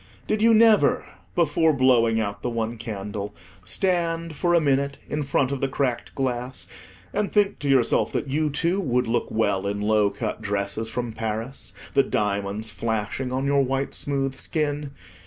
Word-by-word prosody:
Did 215 0 0
you 230 +1 +6
never, 220 -2 +5 0.3
before 160 -1 +3
blowing 120 -4 +4
out 100 -2 -3
the 125 - -1
one 115 0 -3
candle, 105 -2 -5 0.3
stand 165 - 0
for 175 +3 +2
a - - +6
minute 140 -2 +1
in 150 - -2
front 140 -1 +1
of 140 - -3
the 135 - +2
cracked 130 -3 -2
glass, 125 -1 -2 0.5
and 205 0 0
think 205 -1 +2
to 145 - -2
yourself 130 -3 +3
that - - -1
you, 150 +3 +1
too, 170 +6 0
would 125 -6 +1
look 115 +1 0
well 100 -3 0
in 100 +1 -2
low 105 0 +3
cut 105 +2 -4
dresses 100 +2 -2
from 120 -1 -3
Paris, 110 +4 -4 0.2
the - - +6
diamonds 105 -2 -1
flashing 110 +3 -2
on 130 +1 -1
your 140 0 +3
white 135 +1 -1
smooth 135 -2 -1
skin? 145 +1 -2
130 Hz, 170 wpm, -24 LUFS, 110-145 Hz, 0.5 s, you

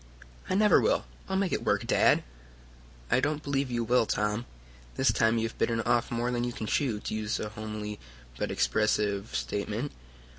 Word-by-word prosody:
"I - - +1
never 210 +1 +5
will. - - +2 0.2
I'll 190 - 0
make 195 -2 0
it - - -1
work, - - +1
Dad!" - - +4 0.9
"I - - +5
don't 150 +2 -1
believe 140 -1 0
you 120 -1 -1
will, 120 0 +3
Tom. 105 +3 -1 0.5
This 130 -3 +3
time 115 +1 +3
you 115 0 +1
have 110 - -12
bitten 115 -1 +1
off 120 0 +1
more 120 +1 -1
than 120 -1 -1
you 120 0 -2
can 110 - -5
chew, 115 -1 0
to - - -4
use 110 0 -1
a 105 - -3
homely 105 -1 -6 0.4
but - - -1
expressive 105 -1 +1
statement." 105 - -2
115 Hz, 185 wpm, -29 LUFS, 105-125 Hz, 0.9 s, never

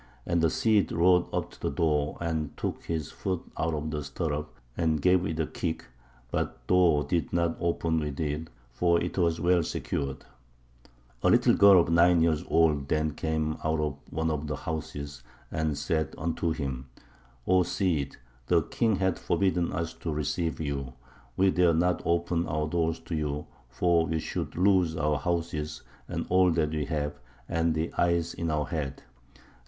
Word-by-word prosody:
And 85 -1 +1
the 80 - +4
Cid 105 0 +2
rode 90 +1 +3
up - - -2
to - - -17
the - - 0
door, 75 0 0
and 80 -3 -3
took - - -4
his 80 -3 -3
foot 95 -3 -3
out 80 0 -1
of 75 +1 -3
the 75 -1 -3
stirrup, 75 +1 -3 0.2
and 80 -2 +1
gave 90 +3 +3
it 80 0 -3
a 80 - +2
kick, 80 +1 -4 0.5
but - - -1
the - - 0
door 85 -5 +4
did 85 -2 -1
not 85 -1 +1
open 85 -1 0
with 75 -3 -4
it, 80 +1 -2 0.2
for 85 +7 +2
it 85 - -3
was 85 -2 +2
well 90 0 +3
secured; 70 -3 -3 1.0
a - - +3
little - - +5
girl 100 -2 +7
of 85 - +1
nine 85 +1 +5
years 80 -2 +2
old 75 -4 +3
then 75 +1 +1
came 80 +1 -2
out 80 0 +1
of 75 -2 -1
one 80 +1 -1
of 75 0 -3
the 75 - -2
houses 70 -3 -5 0.3
and 75 -2 -1
said 80 0 -1
unto 85 +1 -1
him, 65 -4 -4 0.6
O 95 0 +4
Cid, 85 -6 -1 0.3
the 85 0 +3
king 110 +4 +1
hath 95 -1 0
forbidden 90 -3 +1
us 80 0 -3
to 80 0 -5
receive 75 +2 -2
you. 70 -4 -3 0.4
We 95 0 +4
dare 90 -3 +3
not 90 +2 +2
open 85 0 +1
our 75 0 -1
doors 80 0 0
to 85 - -7
you, 75 -1 -2 0.2
for 85 +5 +2
we 80 - 0
should 80 - -4
lose 90 -3 +3
our 75 -1 +1
houses 80 -1 -2 0.2
and - - -3
all 90 0 +5
that 80 -2 +1
we 75 -2 -1
have, 75 -2 -3 0.3
and 85 -1 +1
the 80 +2 -2
eyes 85 -1 +2
in 85 -1 -3
our 75 -1 0
head. 75 -5 -4
80 Hz, 180 wpm, -28 LUFS, 75-85 Hz, 1.0 s, girl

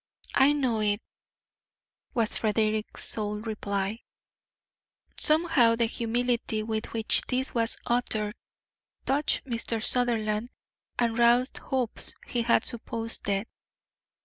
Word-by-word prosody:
"I 275 +2 +5
know 255 -6 0
it," 205 -1 +1 1.2
was 230 -2 +1
Frederick's 215 0 -1
sole 210 -1 -1
reply. 205 -1 -3 1.2
Somehow 305 -7 +4
the 230 0 +2
humility 235 -1 -1
with 220 0 -3
which 225 -1 +2
this 260 +1 -1
was 230 -1 +2
uttered 220 -3 0 0.7
touched 290 +2 +1
Mr. 230 -2 -2
Sutherland 230 -2 0 0.5
and 235 -1 0
roused 240 +2 +3
hopes 255 -4 0
he 240 - -1
had 235 0 +2
supposed 230 -1 -1
dead. 200 +1 0
230 Hz, 105 wpm, -27 LUFS, 215-245 Hz, 1.2 s, I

